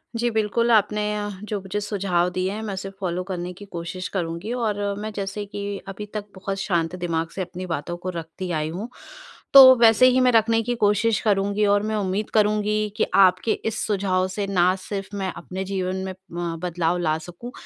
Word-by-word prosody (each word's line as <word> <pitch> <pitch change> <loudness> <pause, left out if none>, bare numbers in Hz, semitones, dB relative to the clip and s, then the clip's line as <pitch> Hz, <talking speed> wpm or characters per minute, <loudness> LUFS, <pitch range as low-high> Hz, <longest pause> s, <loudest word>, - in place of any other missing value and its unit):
जी, 240 +1 +1
बिल्कुल 220 +2 +1
आपने 210 -1 +3
अ, 205 0 -3
जो 210 -1 -3
मुझे 190 +2 -3
सुझाव 190 -4 0
दिए 185 +1 0
हैं 215 +2 -5
मैं 210 -2 -4
उसे 190 +1 -5
फॉलो 180 -2 -2
करने 180 -1 -3
की 205 +3 -12
कोशिश 175 0 -5
करूँगी 175 +4 -3
और 205 -2 -1 0.2
मैं 215 +1 -4
जैसे 200 +1 -4
कि 200 0 -5
अभी 195 +2 -6
तक 210 -1 -4
बहुत 195 +1 -4
शांत 175 -3 0
दिमाग 165 -2 -2
से 195 - -3
अपनी 180 0 -6
बातों 170 0 -4
को 180 +1 -5
रखती 170 +1 -6
आई 155 -1 -1
हूँ। 195 +9 -5 0.6
तो 260 -1 +11
वैसे 230 +1 +6
ही 255 0 +3
मैं 250 0 +5
रखने 225 0 +3
की 245 +2 -1
कोशिश 210 0 +2
करूँगी 205 0 +1
और 205 0 +3
मैं 215 0 -1
उम्मीद 200 0 -1
करूँगी 210 0 +2
कि - - +3
आपके 195 +3 +5
इस 220 -1 -1
सुझाव 190 -3 +1
से 200 +1 -3
ना 185 -1 +3
सिर्फ़ 195 +1 -6
मैं 190 -1 -2
अपने 185 +2 -5
जीवन 185 -1 -2
में 190 - -4 0.2
उम, 170 -1 -3
बदलाव 175 -1 0
ला 155 -3 +1
सकूँ 175 +9 -9
195 Hz, 200 wpm, -23 LUFS, 180-210 Hz, 0.6 s, तो